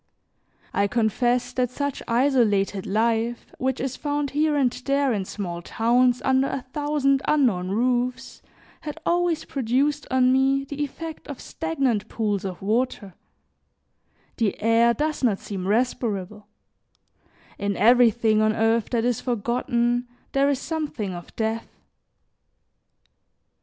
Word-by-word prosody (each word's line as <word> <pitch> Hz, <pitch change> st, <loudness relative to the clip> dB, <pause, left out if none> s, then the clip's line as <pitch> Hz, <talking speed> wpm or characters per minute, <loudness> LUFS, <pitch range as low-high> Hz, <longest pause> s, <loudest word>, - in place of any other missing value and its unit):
I 200 Hz, 0 st, +2 dB
confess 240 Hz, +3 st, 0 dB
that 250 Hz, -1 st, 0 dB
such 285 Hz, +2 st, -3 dB
isolated 230 Hz, -6 st, +2 dB
life, 230 Hz, +3 st, 0 dB
which 260 Hz, 0 st, -1 dB
is 265 Hz, -1 st, -3 dB
found 290 Hz, -2 st, -2 dB
here 300 Hz, +1 st, +1 dB
and 265 Hz, -4 st, +2 dB
there 275 Hz, +1 st, 0 dB
in 200 Hz, -3 st, -2 dB
small 175 Hz, -4 st, -5 dB
towns, 245 Hz, +5 st, +2 dB
under 265 Hz, +1 st, +3 dB
a 270 Hz, -2 st, -3 dB
thousand 290 Hz, -2 st, +1 dB
unknown 230 Hz, -12 st, +2 dB
roofs, 250 Hz, +4 st, -1 dB, 0.4 s
had 305 Hz, +1 st, -7 dB
always 345 Hz, -2 st, +1 dB
produced 275 Hz, +3 st, 0 dB
on 255 Hz, -1 st, +3 dB
me 270 Hz, +1 st, +2 dB
the 285 Hz, +1 st, -4 dB
effect 320 Hz, +3 st, -7 dB
of 285 Hz, -, -7 dB
stagnant 275 Hz, -10 st, -1 dB
pools 210 Hz, -3 st, -2 dB
of 185 Hz, -1 st, -6 dB
water; 215 Hz, -2 st, -1 dB, 1.2 s
the 225 Hz, -5 st, 0 dB
air 230 Hz, +2 st, +3 dB
does 305 Hz, +2 st, -2 dB
not 220 Hz, -6 st, +3 dB
seem 190 Hz, -2 st, -6 dB
respirable: 210 Hz, -3 st, -1 dB, 1.1 s
in 200 Hz, -1 st, -1 dB
everything 230 Hz, -2 st, +4 dB
on 215 Hz, 0 st, +3 dB
earth 225 Hz, 0 st, +1 dB
that 235 Hz, -1 st, 0 dB
is 245 Hz, -2 st, 0 dB
forgotten, 240 Hz, +1 st, 0 dB, 0.2 s
there 275 Hz, +1 st, +3 dB
is 280 Hz, -, +1 dB
something 290 Hz, -, -4 dB
of 175 Hz, -1 st, -10 dB
death. 225 Hz, 0 st, -2 dB
245 Hz, 125 wpm, -24 LUFS, 220-275 Hz, 1.2 s, everything